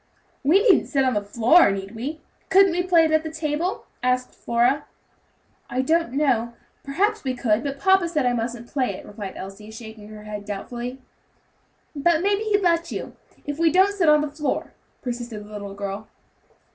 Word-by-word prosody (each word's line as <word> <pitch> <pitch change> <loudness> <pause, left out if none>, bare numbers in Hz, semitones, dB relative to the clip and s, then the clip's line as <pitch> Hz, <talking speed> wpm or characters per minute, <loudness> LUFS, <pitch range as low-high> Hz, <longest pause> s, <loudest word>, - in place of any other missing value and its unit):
"We 350 +9 +4
needn't 415 -7 +4
sit 275 -3 +2
on 255 - +2
the 205 - 0
floor, 235 +9 +5
need 195 +1 -4
we? 280 +8 -5 0.3
Couldn't 390 0 +6
we 350 +1 0
play 350 -3 +4
it 315 - 0
on 315 - +4
the 315 - -5
table?" 315 +3 -2 0.2
asked 250 0 0
Flora. 245 +5 +1 0.8
"I 255 +2 0
don't 325 -2 +1
know; 250 -5 +1 0.3
perhaps 410 +10 0
we 260 -2 -2
could; 230 -2 +1
but 280 -1 -3
papa 380 0 +4
said 305 -5 0
I 245 - +2
mustn't 235 0 -3
play 255 -8 -1
it," - - -10
replied 205 -2 -8
Elsie, 195 +3 -9
shaking 220 -1 -10
her 215 0 -11
head 210 -1 -6
doubtfully. 240 +5 -6 1.0
"But 325 +3 +2
maybe 405 +1 +2
he'd 410 -2 +2
let 335 -1 +2
you, - - -5 0.3
if 290 +1 -4
we 330 -1 +4
don't 380 +4 +4
sit 360 -6 +3
on 300 0 +6
the 300 -1 -3
floor," 300 0 -3 0.3
persisted 240 -4 -5
the 210 - -14
little 200 -1 -7
girl. 200 +1 -5
265 Hz, 185 wpm, -23 LUFS, 220-330 Hz, 1.0 s, Couldn't